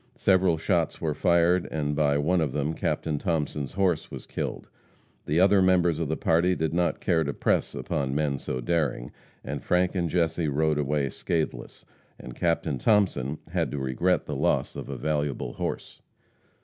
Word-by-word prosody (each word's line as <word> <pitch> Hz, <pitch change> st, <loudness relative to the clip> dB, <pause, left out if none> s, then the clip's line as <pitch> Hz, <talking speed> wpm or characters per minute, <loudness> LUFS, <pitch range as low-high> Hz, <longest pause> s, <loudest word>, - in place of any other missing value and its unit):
Several 95 Hz, -3 st, +3 dB
shots 85 Hz, 0 st, 0 dB
were 80 Hz, -2 st, -1 dB
fired, 85 Hz, +2 st, +3 dB
and 75 Hz, -2 st, -2 dB
by 70 Hz, -1 st, +2 dB
one 85 Hz, +5 st, +2 dB
of 75 Hz, -5 st, -1 dB
them 75 Hz, +2 st, -1 dB
Captain 80 Hz, -2 st, -2 dB
Thomason's 75 Hz, -4 st, -2 dB
horse 95 Hz, -4 st, 0 dB
was -, -, -8 dB
killed. -, -, -5 dB, 0.6 s
The 75 Hz, +4 st, +2 dB
other 95 Hz, +1 st, +5 dB
members 90 Hz, -3 st, +3 dB
of 85 Hz, -, -1 dB
the 80 Hz, -, -2 dB
party 85 Hz, +3 st, +2 dB
did 80 Hz, -1 st, -1 dB
not 85 Hz, 0 st, +1 dB
care 80 Hz, -3 st, +1 dB
to 70 Hz, -1 st, -3 dB
press -, -, 0 dB
upon 70 Hz, -1 st, -2 dB
men 75 Hz, -3 st, 0 dB
so 65 Hz, -, -4 dB
daring, 75 Hz, -4 st, -1 dB, 0.3 s
and 70 Hz, +1 st, -5 dB
Frank 90 Hz, 0 st, +1 dB
and 85 Hz, -3 st, -1 dB
Jesse 85 Hz, -1 st, 0 dB
rode 75 Hz, +1 st, +1 dB
away 70 Hz, -1 st, 0 dB
scathless, 75 Hz, -6 st, -3 dB, 0.3 s
and 65 Hz, -, -9 dB
Captain 80 Hz, -4 st, -1 dB
Thomason 85 Hz, -, +2 dB
had -, -, 0 dB
to 70 Hz, -, -4 dB
regret 70 Hz, +7 st, 0 dB
the -, -, -4 dB
loss -, -, 0 dB
of -, -, -7 dB
a -, -, -4 dB
valuable 75 Hz, -5 st, -2 dB
horse. -, -, -5 dB
80 Hz, 175 wpm, -26 LUFS, 75-85 Hz, 0.6 s, other